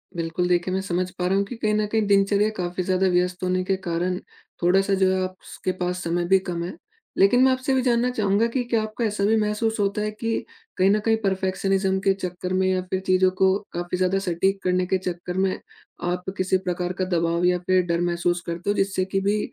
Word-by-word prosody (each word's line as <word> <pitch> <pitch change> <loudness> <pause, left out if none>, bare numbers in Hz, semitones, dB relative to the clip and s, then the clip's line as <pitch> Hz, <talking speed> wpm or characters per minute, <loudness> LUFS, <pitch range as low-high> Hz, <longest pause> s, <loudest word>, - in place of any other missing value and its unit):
बिल्कुल, 170 +1 -1
देखिए 180 +1 +1
मैं 190 - 0
समझ 185 -1 -2
पा 180 -1 -4
रहा 190 - +1
हूँ 200 - +2
कि 245 - -7
कहीं 215 -2 0
न 215 0 +1
कहीं 220 0 0
दिनचर्या 200 +1 +3
काफ़ी 180 0 -2
ज़्यादा 185 +1 +1
व्यस्त 180 0 0
होने 185 0 +1
के 190 +1 0
कारण 175 +2 -1 0.5
थोड़ा-सा 195 +3 +3
जो 190 -1 +3
है 190 - 0
आप 185 0 -4
स - - -11
के 185 - +2
पास 180 0 -2
समय 175 +1 -1
भी 190 +1 +5
कम 175 -2 -4
है। 175 - -5 0.5
लेकिन 245 +6 +5
मैं 265 - +5
आपसे 260 +1 -1
ये - - +3
भी 260 - +2
जानना 245 0 +2
चाहूँगा 215 -1 +1
कि 245 +2 -1
क्या 235 -2 0
आपको 215 +2 -4
ऐसा 210 -2 -1
भी 220 +2 +3
महसूस 215 +2 -1
होता 200 +1 0
है 210 0 -1
कि 225 +1 -3 0.3
कहीं 185 +1 +4
न 210 - +3
कहीं 225 -1 +3
परफेक्शनिज़्म 190 0 0
के 195 0 +2
चक्कर 180 -1 -4
में। 185 0 +2
या 185 0 +1
फ़िर 190 - 0
चीज़ों 185 0 +3
को 190 0 +4 0.2
काफ़ी 175 +1 -3
ज़्यादा 185 +1 +1
सटीक 190 +1 0
करने 180 0 +1
के 190 - +2
चक्कर 180 -1 -5
में 190 0 +1 0.5
आप 180 +1 -3
किसी 185 0 +2
प्रकार 180 -1 -3
का - - +2
दबाव 170 +1 +1
या 180 0 +3
फ़िर 185 +1 +2
डर 170 0 0
महसूस 175 0 0
करते 170 +3 -4
हो। 205 - +2
जिससे 195 -2 0
कि 190 +1 -1
भी 205 +2 +1
190 Hz, 235 wpm, -24 LUFS, 180-200 Hz, 0.5 s, भी